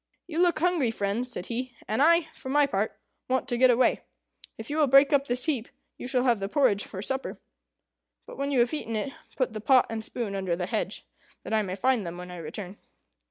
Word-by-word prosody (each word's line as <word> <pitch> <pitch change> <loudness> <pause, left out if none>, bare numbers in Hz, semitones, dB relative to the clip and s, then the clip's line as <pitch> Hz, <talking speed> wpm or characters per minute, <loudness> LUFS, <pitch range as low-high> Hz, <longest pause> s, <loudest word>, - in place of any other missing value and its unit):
"You 335 -2 -4
look 350 -1 +3
hungry, 335 -6 +2
friends," 225 +3 -2
said 180 - -5
he, 245 +2 -4
"and 220 +5 0
I, 335 +3 +6
for 260 - -9
my 290 +1 +4
part, 215 -6 -2 0.3
want 260 0 0
to 240 - 0
get 255 +1 +5
away. 245 +1 +3 0.6
If 225 - -8
you 300 - -1
will 305 -2 +4
break 275 +3 +6
up 280 0 +3
this 245 +1 0
heap, 270 -8 -1 0.3
you - - -7
shall 250 -1 +1
have 240 -4 +3
the 195 0 -3
porridge 230 -6 +2
for 190 0 -7
supper. 265 +4 -3 0.9
But - - -10
when 280 0 -1
you 265 -4 +3
have 240 +3 +1
eaten 230 -7 -3
it, 270 +6 -3 0.2
put 255 -4 -1
the 215 - -5
pot 255 +2 +5
and 220 -1 -3
spoon 220 -3 -4
under 190 -3 -1
the 180 +1 -3
hedge, - - -3 0.4
that - - -5
I 220 - +3
may 185 -3 -3
find 250 +2 +1
them 170 -1 -6
when 180 0 -8
I 180 - -8
return." 180 +5 -6
245 Hz, 230 wpm, -27 LUFS, 205-275 Hz, 0.9 s, I